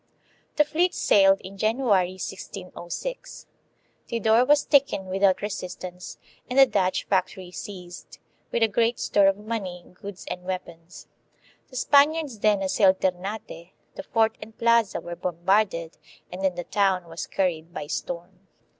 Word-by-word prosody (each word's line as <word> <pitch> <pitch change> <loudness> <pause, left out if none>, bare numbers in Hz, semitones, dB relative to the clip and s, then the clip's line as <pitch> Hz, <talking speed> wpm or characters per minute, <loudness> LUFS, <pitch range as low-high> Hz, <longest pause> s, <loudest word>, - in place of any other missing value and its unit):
1 - - -43 0.5
The 300 - +5
fleet 335 +4 +1
sailed 195 -1 +5
in 195 +1 -10
January, 215 -5 +2
1606. 190 - -7 0.6
Tidor 230 +1 +3
was 295 0 +4
taken 275 -9 +3
without 190 0 +2
resistance 180 -2 -6 0.3
and 250 - -3
the 270 - +9
Dutch 195 -6 0
fac 185 -1 +1
tory 185 -2 -11
seized, 180 -2 -9 0.3
with 235 - +1
a - - +5
great 230 +2 +1
store 200 -1 +3
of 195 0 +2
money, 205 -5 -5
goods, 200 0 -9
and 180 - -5
weapons. 180 -2 -7 0.6
The 255 - -15
Spaniards 285 -1 +3
then 205 -2 +2
assailed 190 0 +3
Ternate; 185 -1 -4 0.2
the - - -7
fort 225 -1 +2
and 220 - -11
plaza 230 -2 +3
were 175 0 -7
bombarded, 175 -1 0 0.3
and 185 +2 -6
then 190 -2 +1
the 175 - -4
town 190 -2 +1
was 165 0 -6
car 195 - 0
ried 165 -2 -3
by 170 - -5
storm. 175 +5 -6
195 Hz, 150 wpm, -25 LUFS, 180-225 Hz, 0.6 s, the